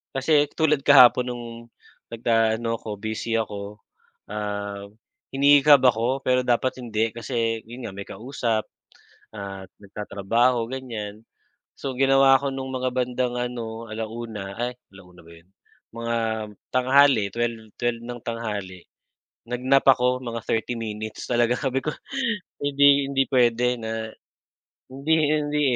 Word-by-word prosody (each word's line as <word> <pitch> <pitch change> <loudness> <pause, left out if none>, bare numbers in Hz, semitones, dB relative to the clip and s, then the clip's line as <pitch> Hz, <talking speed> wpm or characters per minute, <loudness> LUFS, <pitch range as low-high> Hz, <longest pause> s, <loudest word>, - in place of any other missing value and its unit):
kasi 145 +2 +3
tulad 155 -2 +2
kahapon 125 -3 +7
nung 120 -1 -5 0.6
nag 115 0 -10
a 115 -1 +3
ano 115 0 -3
ako, 105 -2 -6
busy 110 +2 -3
ako, 105 -2 -4 0.5
ah, 100 -1 -4 0.5
hinihikab 145 0 +6
ako 125 +2 +2
pero 130 0 +3
dapat 125 +1 0
hindi 115 -2 -1
kasi 115 -1 -2
yun 120 +2 -9
nga 110 - -5
may 100 0 -8
kausap 115 0 -2 0.7
at 100 -2 -7 0.2
nagtatrabaho, 115 +4 0
ganyan. 115 -5 -6 0.6
So, 135 - -3
ginawa 135 0 +6
ko 140 +1 -2
nung 130 0 -5
mga 130 0 -1
bandang 125 -1 -1
ano, 115 -2 -5
1:00 110 -2 -6
ay 125 +1 -2 0.2
1:00 90 -2 -16
ba - - -15
'yon, 85 +2 -19 0.5
mga 115 0 -2 0.5
tanghali, 130 -2 +4
12:00, 115 -2 -3
12:00 120 -1 -1
ng 120 0 -7
tanghali, 105 -6 -5 0.6
nag-nap 130 +3 +2
ako, 125 -1 +4
mga 115 -1 -4
30 115 +2 0
minutes 110 -1 -6
talaga, 120 0 +2
sabi 135 -2 -1
ko 155 - -1 0.7
hindi 140 0 +4
hindi 135 -1 +2
puwede 125 -1 +3
na 110 0 -4 0.8
hindi 140 +4 -1 0.2
hindi, 150 -1 0
120 Hz, 130 wpm, -24 LUFS, 110-130 Hz, 0.8 s, kahapon